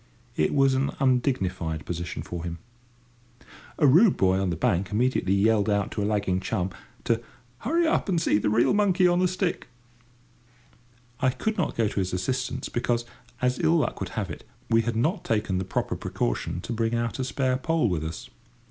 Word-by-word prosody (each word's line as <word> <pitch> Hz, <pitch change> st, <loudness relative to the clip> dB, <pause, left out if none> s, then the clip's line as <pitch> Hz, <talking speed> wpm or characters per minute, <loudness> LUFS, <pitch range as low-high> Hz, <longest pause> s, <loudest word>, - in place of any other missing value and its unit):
It 75 Hz, -, +1 dB
was 135 Hz, -1 st, +4 dB
an 135 Hz, +1 st, +1 dB
undignified 95 Hz, -, 0 dB
position 85 Hz, -1 st, -4 dB
for 85 Hz, -1 st, -6 dB
him. 85 Hz, -1 st, -4 dB, 1.2 s
A 155 Hz, -, +3 dB
rude 170 Hz, -, +6 dB
boy 95 Hz, 0 st, +3 dB
on 95 Hz, -1 st, 0 dB
the 85 Hz, -, -1 dB
bank 95 Hz, -1 st, 0 dB
immediately 105 Hz, -3 st, +1 dB
yelled 105 Hz, +1 st, +3 dB
out 100 Hz, -1 st, 0 dB
to -, -, -3 dB
a -, -, 0 dB
lagging 100 Hz, -3 st, 0 dB
chum 95 Hz, -1 st, -2 dB, 0.3 s
to 115 Hz, 0 st, +1 dB, 0.4 s
"hurry 335 Hz, +8 st, +1 dB
up 320 Hz, -9 st, +1 dB
and 175 Hz, -3 st, +2 dB
see 105 Hz, -10 st, +2 dB
a -, -, +2 dB
real 115 Hz, -, +3 dB
monkey 195 Hz, -3 st, +3 dB
on 175 Hz, +1 st, +2 dB
a 185 Hz, -, +4 dB
stick." 180 Hz, 0 st, -2 dB, 1.5 s
I 130 Hz, -, +3 dB
could 220 Hz, +12 st, -2 dB
not -, -, -1 dB
go 115 Hz, -2 st, +2 dB
to 100 Hz, -, -2 dB
his 95 Hz, -1 st, -2 dB
assistance, 125 Hz, +7 st, -2 dB
because, 120 Hz, 0 st, -1 dB, 0.4 s
as 125 Hz, +1 st, +1 dB
ill 165 Hz, +1 st, +3 dB
luck 155 Hz, -, -1 dB
would -, -, -4 dB
have -, -, -2 dB
it, -, -, -8 dB, 0.3 s
we 115 Hz, 0 st, +5 dB
had 115 Hz, 0 st, -2 dB
not 155 Hz, -, 0 dB
taken 105 Hz, -4 st, 0 dB
the 95 Hz, -, -3 dB
proper -, -, -2 dB
precaution -, -, -2 dB
to 120 Hz, -, -5 dB
bring 115 Hz, 0 st, 0 dB
out 115 Hz, +2 st, -2 dB
a -, -, 0 dB
spare 130 Hz, 0 st, 0 dB
pole 160 Hz, -1 st, +1 dB
with 85 Hz, -6 st, -1 dB
us. 80 Hz, +1 st, -6 dB
115 Hz, 190 wpm, -26 LUFS, 95-135 Hz, 1.5 s, rude